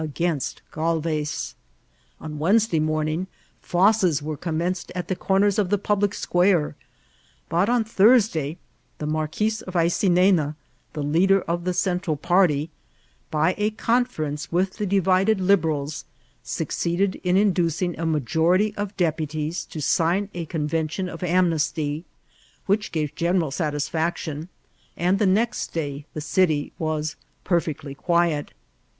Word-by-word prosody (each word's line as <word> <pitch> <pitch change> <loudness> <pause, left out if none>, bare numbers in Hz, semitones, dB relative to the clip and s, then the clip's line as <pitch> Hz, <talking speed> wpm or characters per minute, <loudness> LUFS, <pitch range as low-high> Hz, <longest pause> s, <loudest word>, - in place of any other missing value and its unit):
against 155 -1 -2
Ghdves. 155 -2 -1 0.7
On 150 -1 -7
Wednesday 195 +1 +3
mom* 155 0 0
ing 165 +5 -2 0.4
foeste 180 -5 +3
were 155 0 -3
c<Hnmenced 170 +4 -2
at 180 -1 -4
the 185 - 0
comera 195 +2 +2
of 195 -4 +1
the 205 - +3
pi^ 205 0 0
lie 205 - +3
square; 175 -5 +1 0.7
but 175 +6 +2
on 240 -1 +3
Thursday 205 - +3 0.4
the 150 - -5
Marquis 155 +8 0 0.2
of 185 - -7
Aydneau^ 175 -2 +3 0.4
the 150 - -3
leader 185 +6 +3
oi 170 - +1
the 180 +1 -3
Central 180 -5 0
party, 160 -2 +2 0.6
by 160 +4 +2
a 210 +1 +2
conference 215 -10 -1
with 185 +2 0
the 210 -1 -2
divided 190 +2 +3
Liberals, 160 -7 +1 0.4
succeeded 185 +3 -1
in 180 0 +2
indtHung 175 -3 +1
a - - -3
majonty 165 - +2
of 205 -1 -4
dq>utie8 155 -1 -2
to 160 - -6
sign 175 +7 +1
a 170 -2 -5
convention 160 +3 -2
of 165 - -8
anmesty, 165 -3 0 0.6
which 210 +2 0
gave 155 -2 -2
general 170 -2 0
8atis£Eu:tik>n9 155 +1 -2 0.5
and 180 +3 +2
the 210 - +3
next 215 +5 0
day 145 -2 -4
the 155 - -3
city 155 -2 +1
was 155 -1 -2 0.3
per* 175 -2 +3
fectly 145 -3 -6
quiet. 170 -2 +1
170 Hz, 130 wpm, -24 LUFS, 155-190 Hz, 0.7 s, Wednesday